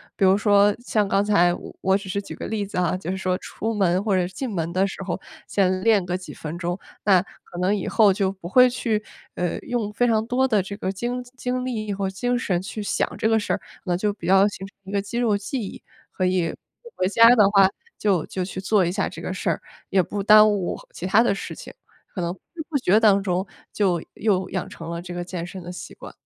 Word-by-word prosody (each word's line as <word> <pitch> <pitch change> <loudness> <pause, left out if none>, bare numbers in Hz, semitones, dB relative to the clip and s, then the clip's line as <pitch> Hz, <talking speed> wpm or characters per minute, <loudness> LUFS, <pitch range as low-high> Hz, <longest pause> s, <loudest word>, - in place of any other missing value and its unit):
比 - - -1
如 190 +1 +5
说 205 -1 +4
像 215 -4 0
刚 195 +1 +2
才， 180 -4 +4 0.3
我 190 0 +3
只 200 -1 -10
是 200 +2 -1
举 195 - -9
个 - - -6
例 215 -2 -2
子 195 - -7
啊， 180 0 +1
就 180 -2 -7
是 190 - -3
说 185 -1 0
出 225 +4 -4
门 190 -2 +2
或 205 -3 +1
者 180 -1 +2
是 185 - -13
进 260 +6 -4
门 165 -2 -2
的 190 +2 +2
时 195 - -7
候 180 -2 -3 0.3
先 185 -1 +1
练 215 -4 +4
个 180 0 -1
几 185 - -10
分 160 +2 -6
钟， 175 +1 -3 0.3
那 190 -4 +5 0.2
可 175 - -9
能 185 +3 +2
以 195 - -3
后 210 -4 +5
就 190 -1 0
不 190 -3 -9
会 250 +7 +6
去， 230 -3 -1 0.3
呃， 175 -1 -2
用 235 -4 -3
非 245 +3 +2
常 220 -1 +2
多 255 +3 +1
的 215 -6 +2
这 200 +2 -6
个 190 - -2
精 240 +6 -3 0.2
精 250 0 -2
力 215 -5 -3
和 195 -1 -2
精 245 +6 -1
神 180 -7 0
去 210 +3 -6
想 205 - -1
这 - - +1
个 225 0 +3
事 205 - -3
儿， - - -2 0.2
那 180 -2 +1
就 205 +2 0
比 200 - -10
较 195 +3 +5
形 195 -2 -6
成 195 - -14
一 190 - -8
个 200 -1 +1
肌 205 +4 -6
肉 225 -4 +2
记 205 +6 -4
忆， 200 - -7 0.3
所 185 - +1
以 180 -2 +1 0.3
不 470 - -12
回 185 - +1
家 230 +3 +7
的 210 -4 +5
话 195 -2 +6 0.3
就 190 -6 +1
就 185 - -3
去 185 0 -6
做 195 -1 +3
一 170 - 0
下 200 - -1
这 - - -9
个 - - -4
事 - - -2
儿， - - -1 0.3
也 190 - +4
不 200 +3 -4
耽 215 +1 +8
误 200 -4 -1
其 180 - -6
它 200 +4 +5
的 230 -4 +2
事 - - -6
情， - - -10 0.4
可 185 - -3
能 170 0 -1
不 185 - -17 0.2
知 320 - -5
不 305 - +1
觉 205 -3 +4
当 200 -3 +5
中 185 -1 -1 0.3
就 185 -5 +1
又 190 -3 0
养 185 -2 -3
成 165 0 -9
了 170 0 -4
这 175 0 -8
个 175 0 -3
健 175 -2 -5
身 185 +1 -8
的 175 - -7
习 - - -9
惯。 - - -11
195 Hz, 275 characters per minute, -23 LUFS, 185-215 Hz, 0.4 s, 耽